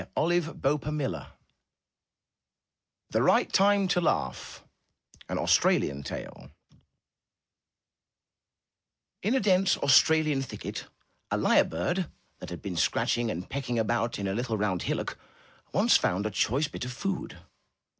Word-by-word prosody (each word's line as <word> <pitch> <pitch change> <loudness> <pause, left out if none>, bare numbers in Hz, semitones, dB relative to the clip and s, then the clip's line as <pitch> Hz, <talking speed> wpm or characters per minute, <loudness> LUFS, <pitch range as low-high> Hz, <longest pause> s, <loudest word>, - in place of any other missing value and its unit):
Ill 160 - +2
MY 175 0 +4
BOOK 150 -3 -2
HOUSE 140 - -3 1.8
THE - - +2
RIGHT - - +3
TIME 200 0 +4
TO 180 0 +1
LAUGH 165 - -2 0.7
An - - -2
Australian 70 0 +2
Tale 65 -2 -8 2.7
In 220 +7 +1
a - - +3
dense 190 -3 +3
Australian 155 +1 +4
thicket, 135 - -6 0.4
a - - 0
lyre - - +4
bird 155 - -2 0.3
that - - -8
had 90 - -8
been 95 -4 -4
scratching 120 +7 +1
and 90 -3 -4
pecking 130 -3 -3
about 115 +1 0
in 100 - -3
a 95 - -1
little 115 0 -2
round 100 -4 -1
hillock, - - -3 0.5
once - - +4
found 95 +4 -1
a 110 - -1
choice 135 +9 +1
bit 145 - -7
of 125 - -5
food. 195 +10 -4
130 Hz, 130 wpm, -28 LUFS, 100-165 Hz, 2.7 s, MY